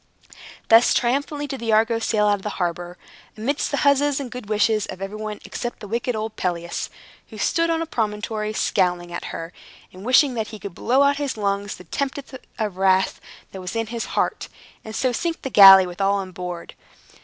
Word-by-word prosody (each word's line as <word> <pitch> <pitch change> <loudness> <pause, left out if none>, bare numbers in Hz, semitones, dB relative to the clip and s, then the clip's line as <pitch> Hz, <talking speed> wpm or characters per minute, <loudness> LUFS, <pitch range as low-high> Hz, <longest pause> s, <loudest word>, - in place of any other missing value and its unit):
Thus 225 +1 +6
triumphantly 285 +4 0
did 270 -2 -6
the 230 -1 -2
Argo 225 +1 +3
sail 215 -2 +1
out 205 - +4
of - - -14
the 210 +1 -5
harbor, 175 0 -3 0.4
amidst 275 +7 -1
the 285 - -1
huzzas 280 0 +3
and 260 -4 -6
good 250 -4 -8
wishes 215 0 +2
of 185 - -8
everybody 210 +2 -5
except 240 -1 -5
the 205 - -9
wicked 235 +3 -2
old 220 0 -4
Pelias, 170 -2 -3 0.4
who - - -11
stood 335 0 +1
on 330 0 0
a - - -5
promontory, 215 -5 -2
scowling 180 -4 0
at 170 - -5
her, 165 +1 -6 0.4
and 185 +1 -11
wishing 255 +3 +4
that 220 -3 -2
he 220 - -9
could 200 -2 -8
blow 255 +9 +2
out 280 - +5
of 285 - -4
his 280 -4 -3
lungs 200 -1 -2
the - - -12
tempest 275 - -4 0.2
of 210 -5 -3
wrath 190 0 +2 0.3
that 190 - -8
was 180 +4 -6
in 225 0 0
his 230 - -3
heart, - - 0 0.4
and 220 0 -8
so 255 +1 +1
sink 330 +7 -3
the 265 - -4
galley 195 -2 +10
with 180 +2 -7
all 195 +1 +3
on 195 -2 -4
board. 180 -1 -7
215 Hz, 205 wpm, -22 LUFS, 190-250 Hz, 0.4 s, galley